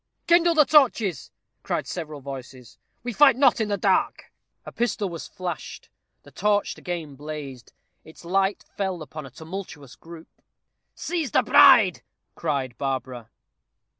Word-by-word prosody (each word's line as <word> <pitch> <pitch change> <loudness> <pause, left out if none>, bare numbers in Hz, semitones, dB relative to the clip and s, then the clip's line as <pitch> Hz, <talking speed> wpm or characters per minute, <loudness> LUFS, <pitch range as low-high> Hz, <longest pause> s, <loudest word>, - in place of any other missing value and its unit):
"Kindle 340 0 +4
the 305 -2 +6
torches," 235 - +2 0.3
cried - - -3
several 155 -4 -6
voices. 130 -3 -10 0.2
"We 245 -1 -4
fight 275 0 +6
not 260 -3 +3
in 220 - 0
the 205 -1 -1
dark." - - 0 0.3
A - - -8
pistol 215 -4 -2
was 170 -2 -7
flashed. 180 -4 -7 0.3
The - - -16
torch 205 +1 0
again 170 -5 -6
blazed. 145 -4 -8 0.3
Its 160 +2 -15
light 195 +3 0
fell 190 -5 -3
upon 155 0 -9
a - - -12
tumultuous 160 -1 -9
group. 165 0 -13 0.7
"Seize 325 -5 -3
the - - +2
bride," 255 - +6 0.3
cried 140 -6 -3
Barbara. 130 -4 -4
175 Hz, 135 wpm, -24 LUFS, 140-220 Hz, 0.7 s, the